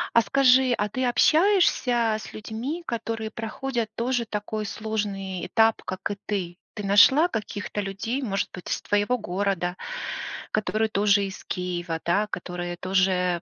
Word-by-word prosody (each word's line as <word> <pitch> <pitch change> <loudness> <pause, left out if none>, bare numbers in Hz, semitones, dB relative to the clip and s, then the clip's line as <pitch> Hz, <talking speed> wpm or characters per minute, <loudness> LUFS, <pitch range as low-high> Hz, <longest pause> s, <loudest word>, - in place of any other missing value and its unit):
А 230 - +8
скажи, 255 +3 +4
а 210 - 0
ты 255 +5 -3
общаешься 250 - +3
с - - -9
людьми, 245 +11 -5
которые 225 -1 -3
проходят 230 0 -3
тоже 245 +1 0
такой 215 0 -4
сложный 200 -4 -3
этап, 225 0 +3
как 185 - -4
и 205 - -2
ты? 180 -4 -3 0.2
Ты 210 -2 -5
нашла 265 - +6
каких-то 205 -5 -4
людей, 210 +7 -3
может 200 -5 -1
быть, 180 - -8
из - - -1
твоего 205 +5 +1
города, 185 -3 -1 0.8
которые 215 +1 +1
тоже 200 -1 +3
из 190 -1 -8
Киева, 175 -2 -3
да, 200 +5 +2
которые 175 -3 -5
тоже 185 -2 +1
210 Hz, 145 wpm, -25 LUFS, 195-235 Hz, 0.8 s, А